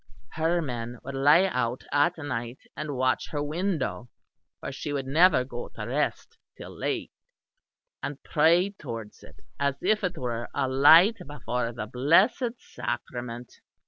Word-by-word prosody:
Her 165 +2 0
men 120 -3 -5
would 140 - -6
lie 145 +6 +5
out 125 -8 -1
at 170 +5 +2
night 125 -5 -4 0.2
and 150 -2 -4
watch 130 0 0
her 145 -1 -2
window 155 -6 -2 0.5
(for - - -6
she 140 +2 -5
would 140 -2 -2
never 155 0 +4
go 120 -1 -7
to 105 - -5
rest 140 +6 -2 0.2
till - - -10
late), - - -3 0.9
and 145 - -4
pray 170 +5 +3
towards 115 - -8
it - - -16 0.2
as 140 -1 +1
if 215 +3 +2
it 180 -2 -2
were 120 -3 -3
a 140 -2 +1
light 160 - +7
before 125 -5 -3
the 115 -2 -5
blessed 170 - +3
sacrament. 120 - -6
140 Hz, 145 wpm, -27 LUFS, 125-165 Hz, 0.9 s, light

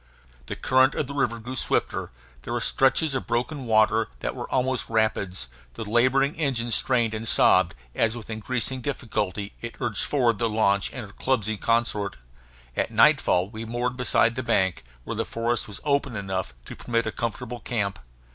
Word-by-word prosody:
The - - -4
current 130 +2 +3
of - - 0
the 140 - -7
river 130 -5 0
grew 120 +3 -7
swifter; - - +1 0.3
there - - -5
were - - 0
stretches 140 +3 +3
of 130 - -3
broken 130 +3 -2
water 110 0 +3
that - - -2
were - - -6
almost 130 -1 0
rapids; 100 - 0 0.3
the 110 - -5
laboring 130 +5 +3
engine 130 -6 -1
strained 115 0 +2
and 110 +1 -4
sobbed 90 -5 +4 0.2
as 115 +1 +1
with 115 - -9
increasing 125 +4 -1
difficulty 105 -7 -3
it 115 0 -6
urged 110 -5 0
forward 120 -7 +1
the 115 - +1
launch 100 -2 +2
and 125 -4 -5
her 100 - -14
clumsy 110 -5 0
consort. 105 - 0 0.6
At - - 0
nightfall 90 +3 +4
we 110 0 -6
moored 120 +2 -2
beside 120 -2 +2
the 130 - -3
bank, 95 -7 +1 0.2
where - - -5
the - - 0
forest 115 0 -1
was 105 -2 -8
open 140 -4 0
enough 95 - -3
to - - -8
permit 115 -1 -1
a 110 - -2
comfortable 120 +1 -4
camp. 100 -8 -2
115 Hz, 175 wpm, -25 LUFS, 110-125 Hz, 0.6 s, sobbed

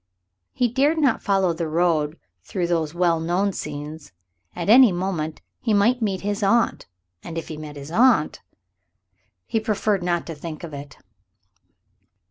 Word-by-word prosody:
He 250 - +1
dared 275 +7 +2
not 280 -7 +2
follow 190 -3 +2
the 165 0 -3
road 160 -1 +1 0.3
through 180 -2 -2
those 165 -2 -1
well 175 -2 +2
known 180 +5 0
scenes. 150 - -7 0.4
At - - -4
any 240 +1 +8
moment 175 -4 -3 0.2
he 220 -4 +1
might 235 +5 +3
meet 195 -4 -1
his 205 +2 -2
aunt. 230 +4 +2 0.4
And 165 -1 -7
if 165 - -5
he 155 - -5
met 150 -1 -8
his 140 +2 -9
aunt... 230 -5 +3 1.0
he 225 - 0
preferred 210 -2 0
not 175 -1 -1
to 165 - -6
think 155 +1 -8
of 165 -3 -7
it. 140 0 -9
175 Hz, 155 wpm, -23 LUFS, 160-210 Hz, 1.0 s, any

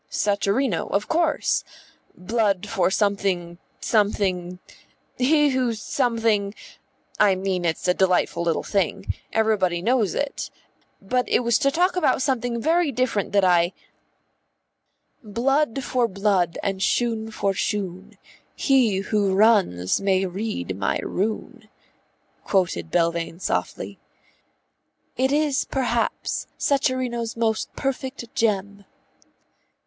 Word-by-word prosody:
"Sacharino, 205 0 0
of 200 +1 0
course. 325 -2 +1 0.5
'Blood 205 0 0
for 185 -3 +1
something, 190 -4 0 0.2
something 190 -4 0 0.6
He 295 +3 +4
who 255 -3 0
something 220 -3 0 0.3
' - - -44 0.3
I 200 -2 +5
mean, 185 -2 -2
it's 165 +2 -1
a 180 - +4
delightful 180 -3 +1
little 170 -1 0
thing. 195 -5 -1 0.2
Everybody 205 -6 +1
knows 225 +1 +1
it. 285 -1 -3 0.5
But 250 +5 0
it - - +3
was 235 -2 +2
to 275 - +3
talk 355 +6 +1
about 265 -7 +2
something 245 -3 -1
very 325 +3 +2
different 250 -5 -1
that 200 -1 +4
I 175 0 +3 0.8
" - - -47
"Blood 270 +1 +1
for 245 -1 +1
blood 195 -4 0
and 195 -1 -2
shoon 225 +1 0
for 200 -3 -1
shoon, 195 +1 -3 0.4
He 240 -9 +3
who 200 -1 0
runs 195 - +3
may 195 -1 +2
read 185 - -4
my 100 0 0
rune," 215 +3 -3 0.7
quoted 170 - 0
Belvane 170 - 0
softly. - - -3 1.2
"It 265 +1 +1
is 295 -2 +1
perhaps 245 -3 -1
Sacharino's 250 -4 0
most 220 -1 0
perfect 260 -3 -4
gem." 200 -2 -1
210 Hz, 115 wpm, -23 LUFS, 190-250 Hz, 1.2 s, I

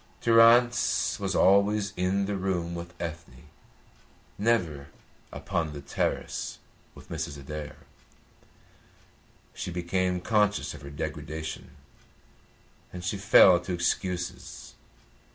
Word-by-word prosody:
Durrance 115 +1 +4
was 95 -2 -2
always 100 +2 +3
in 95 +2 0
the 100 0 -2
room 90 -3 -2
with 85 0 -8
Ethne, 85 -1 -8 0.9
never 90 -11 0 0.4
upon 80 -3 -3
the 70 - -7
terrace - - -3 0.4
with - - -15
Mrs. 70 - -4
Adair. 75 +1 -7 1.8
She 90 - -5
became 90 +1 -1
conscious 105 +2 +1
of - - -11
her 70 - -9
degradation, 75 +1 -6 1.2
and 90 -1 -8
she 85 - -1
fell 95 -2 +6
to 90 +1 -5
excuses. 90 +1 -3
90 Hz, 100 wpm, -27 LUFS, 80-100 Hz, 1.8 s, fell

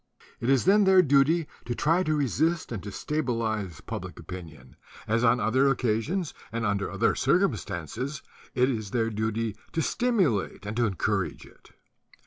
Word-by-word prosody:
It 120 - -2
is 135 -2 +3
then 200 +2 +5
their 190 -1 +6
duty 145 +3 +3 0.2
to 120 0 -3
try 165 +7 +2
to 155 -4 +1
resist 155 +4 0
and 110 -5 -4
to 105 - -7
stabilize 110 - -2
public - - -6
opinion, 80 -8 -10 0.3
as 115 +2 +1
on 120 0 +4
other 130 +5 +3
occasions 135 - 0 0.2
and 115 0 -2
under 100 -1 0
other 100 +4 +1
circumstances 130 - -1 0.3
it 125 0 +4
is 110 -6 -2
their 115 0 0
duty 110 0 -2 0.2
to 165 - 0
stimulate 185 - 0
and 105 +1 -4
to 120 -1 +3
encourage 95 -5 -2
it. - - -20
120 Hz, 155 wpm, -27 LUFS, 105-150 Hz, 0.3 s, their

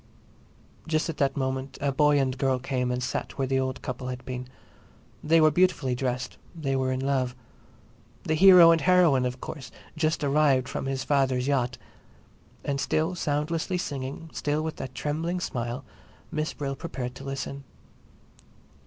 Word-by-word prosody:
Just 160 +1 0
at 155 - -12
that 140 -1 +1
moment 130 0 -2
a 140 -1 0
boy 145 +1 +4
and 130 -2 0
girl 135 -1 +1
came 125 -1 -2
and 125 0 -1
sat 130 - -2
down - - -12
where 135 -1 0
the 135 0 +1
old 130 0 -3
couple 125 0 -4
had 125 0 -6
been. 125 0 -5 0.8
They 165 +2 +4
were 155 -1 +6
beautifully 160 -6 +2
dressed; 125 0 -3 0.2
they 140 -5 -1
were 130 0 0
in 130 0 -1
love. 130 -2 0 0.9
The 155 - 0
hero 175 0 +9
and 165 -1 +3
heroine, 170 -9 +4
of 125 0 -5
course, 140 -6 -7 0.3
just 155 -1 0
arrived 140 -3 +3
from - - -4
his 135 -1 -2
father's 135 -3 +1
yacht. 130 -4 0 0.9
And 140 -1 -1
still 160 +3 0
soundlessly 160 +2 -1
singing, 145 -1 -5
still 150 +1 -1
with 160 0 -4
that 130 - -7
trembling 165 +4 -2
smile, 120 -7 -4 0.5
Miss 155 0 -1
Brill 135 -1 -3
prepared 125 -2 -5
to 135 - -10
listen. 135 0 -5
135 Hz, 165 wpm, -27 LUFS, 130-155 Hz, 0.9 s, hero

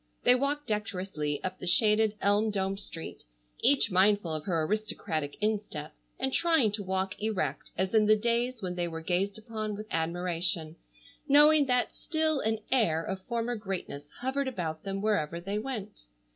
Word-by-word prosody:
They - - +7
walked 280 +3 0
decorously 185 -8 -3
up 185 0 -4
the 180 - -6
shaded, 215 +3 +4
elm 205 +2 +3
domed 195 -1 -1
street, 165 -5 -7 0.4
each 275 -6 +4
mindful 190 -2 +3
of 155 -1 -3
her 165 -4 0
aristocratic 160 -6 -2
instep, 210 -8 -2 0.2
and 265 0 -1
trying 320 -11 +3
to 210 0 -3
walk 190 +1 -2
erect 215 -3 -2
as 190 +3 0
in 215 -1 +4
the 215 - +7
days 235 +1 0
when 180 -1 -2
they 175 -1 -1
were 165 -1 -6
gazed 185 +4 0
upon 215 -1 -4
with 215 +1 -7
admiration, 170 -1 -1 0.5
knowing 295 0 +6
that 250 -1 +1
still 315 -2 0
an 220 -2 0
air 165 -11 +3
of 190 +1 -4
former 235 0 -1
greatness 195 -9 -5 0.2
hovered 265 +2 -1
about 165 -10 -3
them 195 0 -3
wherever 170 -6 0
they 200 +4 -3
went. 215 - -6
205 Hz, 165 wpm, -29 LUFS, 180-230 Hz, 0.5 s, They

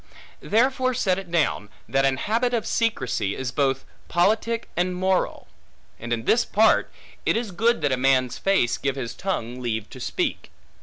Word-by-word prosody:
Therefore 255 +3 +1
set 190 -6 +1
it 190 -3 -10
down, 155 -11 0 0.2
that 135 0 +2
an 135 -1 +2
habit 235 - 0
of 225 - -1
secrecy, 160 - 0
is 130 -2 -3
both 135 -2 0 0.2
politic 220 +6 +1
and 180 +1 0
moral. 185 0 0 0.5
And 120 +1 -7
in 115 -1 -1
this 235 - +4
part, 220 0 +3 0.3
it - - +2
is 230 -3 -3
good 230 +6 +1
that 145 - +1
a 130 - +1
man's 130 -1 +2
face 190 -12 +2
give 135 -1 -1
his 125 -4 -4
tongue 125 -10 -3
leave 110 -3 -2
to - - -10
speak. - - -2
175 Hz, 170 wpm, -24 LUFS, -, 0.5 s, this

